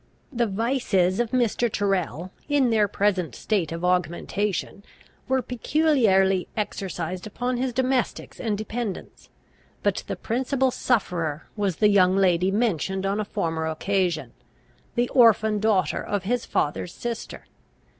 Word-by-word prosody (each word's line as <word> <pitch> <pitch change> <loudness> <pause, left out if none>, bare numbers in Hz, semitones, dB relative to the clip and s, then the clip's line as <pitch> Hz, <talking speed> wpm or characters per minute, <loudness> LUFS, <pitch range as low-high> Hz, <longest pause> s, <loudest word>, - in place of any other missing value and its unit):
The 235 -1 +1
vices 200 -4 +1
of 240 -1 +1
Mr. 240 -1 +1
Tyrrel, 185 -4 -1 0.2
in 280 -4 +3
their 215 -2 +3
present 195 -3 0
state 190 -8 -1
of 165 +1 -3
augmentation, 180 +3 -1 0.4
were 260 -1 +1
peculiarly 225 - +2
exercised 185 -3 -3
upon 245 +4 -2
his 255 +1 -1
domestics 255 0 -1
and 215 -4 -1
dependents. 215 -1 -5 0.5
But - - 0
the - - -3
principal 260 +2 0
sufferer 170 - -1
was 200 -5 0
the 210 +3 +4
young 190 -2 +4
lady 185 -1 +3
mentioned 195 -3 0
on 200 +2 0
a - - 0
former 165 -6 -2
occasion, 175 0 -1 0.6
the 240 0 +2
orphan 220 -3 +4
daughter 200 -7 +1
of 205 -2 -2
his 235 +4 -1
father's 150 +4 -1
sister. 235 -1 -6
205 Hz, 130 wpm, -25 LUFS, 185-240 Hz, 0.6 s, the